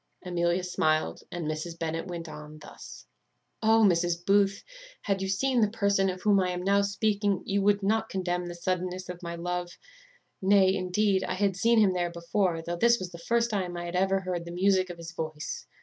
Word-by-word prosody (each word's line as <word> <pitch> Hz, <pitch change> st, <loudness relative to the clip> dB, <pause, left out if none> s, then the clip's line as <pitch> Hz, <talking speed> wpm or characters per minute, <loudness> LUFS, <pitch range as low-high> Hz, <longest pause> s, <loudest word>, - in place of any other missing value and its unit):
Amelia 175 Hz, 0 st, 0 dB
smiled, 155 Hz, -3 st, 0 dB
and 175 Hz, -2 st, -4 dB
Mrs. 155 Hz, +2 st, -4 dB
Bennet 165 Hz, +1 st, -3 dB
went 170 Hz, -2 st, -6 dB
on 150 Hz, 0 st, -10 dB
thus: -, -, -12 dB, 0.6 s
"O, 225 Hz, 0 st, +5 dB
Mrs. 175 Hz, -1 st, +1 dB
Booth! 200 Hz, 0 st, +3 dB, 0.4 s
had 195 Hz, -1 st, -1 dB
you 195 Hz, -, -2 dB
seen 250 Hz, +5 st, +1 dB
the 215 Hz, -, +3 dB
person 200 Hz, -3 st, +1 dB
of 185 Hz, 0 st, -6 dB
whom 205 Hz, -2 st, +4 dB
I 185 Hz, -1 st, +1 dB
am 180 Hz, 0 st, -3 dB
now 200 Hz, +1 st, +3 dB
speaking, 200 Hz, 0 st, 0 dB
you 200 Hz, 0 st, 0 dB
would 200 Hz, 0 st, +2 dB
not 220 Hz, +2 st, +1 dB
condemn 180 Hz, -2 st, -2 dB
the 175 Hz, -, -6 dB
suddenness 185 Hz, +1 st, -3 dB
of 180 Hz, 0 st, -7 dB
my 170 Hz, -1 st, -5 dB
love. 175 Hz, +1 st, -4 dB, 0.6 s
Nay, 190 Hz, -1 st, +5 dB
indeed, 190 Hz, +1 st, +1 dB
I 185 Hz, -, -2 dB
had 195 Hz, -1 st, +1 dB
seen 230 Hz, +4 st, +3 dB
him 205 Hz, -4 st, +5 dB
there 175 Hz, -1 st, -1 dB
before, 170 Hz, 0 st, -1 dB
though 175 Hz, +1 st, -4 dB
this 235 Hz, +5 st, +4 dB
was 185 Hz, -4 st, -6 dB
the 170 Hz, -, -10 dB
first 235 Hz, +6 st, +1 dB
time 185 Hz, -4 st, -2 dB
I 175 Hz, -, -4 dB
had 175 Hz, +1 st, -5 dB
ever 190 Hz, +1 st, +2 dB
heard 180 Hz, -2 st, -3 dB
the 170 Hz, -, -7 dB
music 185 Hz, +1 st, +2 dB
of 175 Hz, -, -7 dB
his 165 Hz, 0 st, -8 dB
voice. 155 Hz, -3 st, -5 dB
185 Hz, 205 wpm, -28 LUFS, 175-200 Hz, 0.6 s, O